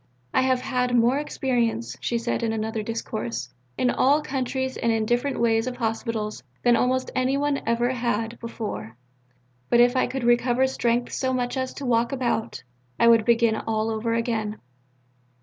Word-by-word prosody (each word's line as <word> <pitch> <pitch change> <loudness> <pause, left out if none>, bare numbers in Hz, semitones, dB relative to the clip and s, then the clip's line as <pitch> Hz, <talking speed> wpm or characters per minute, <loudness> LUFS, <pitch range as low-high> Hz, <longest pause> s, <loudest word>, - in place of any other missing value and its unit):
"I - - +4
have 260 -1 +2
had 250 -1 0
more 240 +4 +3
experience," 235 - -1
she 235 - 0
said 230 - -2
in 230 -1 0
another 220 0 -2
discourse, 130 - -4 0.2
"in 250 - +2
all 290 +3 +3
countries 260 -1 -2
and 230 - 0
in 220 -1 +1
different 245 +5 0
ways 225 0 +2
of 250 -1 -4
Hospitals 225 -2 -2 0.2
than 240 -1 +5
almost 255 +2 +1
any 260 +1 +1
one 290 0 0
ever 240 +2 +2
had 230 -2 -2
before; 205 - -6 0.7
but 240 - +4
if 245 +1 +5
I 255 - +2
could 265 -1 -4
recover 240 +2 +3
strength 245 -2 0
so 260 -1 0
much 245 0 -1
as 260 -1 -2
to 280 - -6
walk 235 -1 +2
about, 245 -4 -2 0.4
I 235 - +5
would 230 -2 +5
begin 230 -1 +3
all 220 0 -1
over 225 +1 -1
again. 220 -2 -2
235 Hz, 170 wpm, -25 LUFS, 225-255 Hz, 0.7 s, than